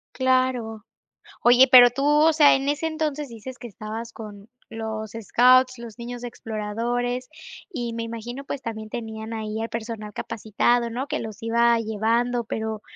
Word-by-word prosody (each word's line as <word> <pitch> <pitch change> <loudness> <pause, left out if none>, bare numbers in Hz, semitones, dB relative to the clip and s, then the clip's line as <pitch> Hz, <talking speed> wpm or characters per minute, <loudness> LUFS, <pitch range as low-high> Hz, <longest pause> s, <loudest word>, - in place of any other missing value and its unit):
Claro. 255 -4 0 0.6
Oye, 245 +2 +7
pero 245 -1 +10
tú, 275 +3 -4
o 300 +2 +5
sea, 300 -2 +6
en 270 +1 -1
ese 295 +2 -1
entonces, 300 -3 -3
dices 235 +3 -9
que 245 - -9
estabas 220 +2 -7
con 210 -2 -10 0.2
los 220 -1 -5
scouts, 255 +3 +4
los 235 -2 -10
niños 245 0 -7
exploradores 240 +3 -3 0.4
y 240 -6 -4
me 230 0 -3
imagino, 230 +4 -6
pues 275 -1 -5
también, 220 -2 -6
tenían 220 -1 -6
ahí 220 0 -4
al 225 - -3
personal 220 -2 -6
capacitado, 230 +2 0
¿no? 255 +5 -3
Que - - -2
los 220 -3 -7
iba 235 +1 +3
llevando, 230 +3 0
pero, 220 -1 -4
235 Hz, 155 wpm, -24 LUFS, 220-255 Hz, 0.6 s, pero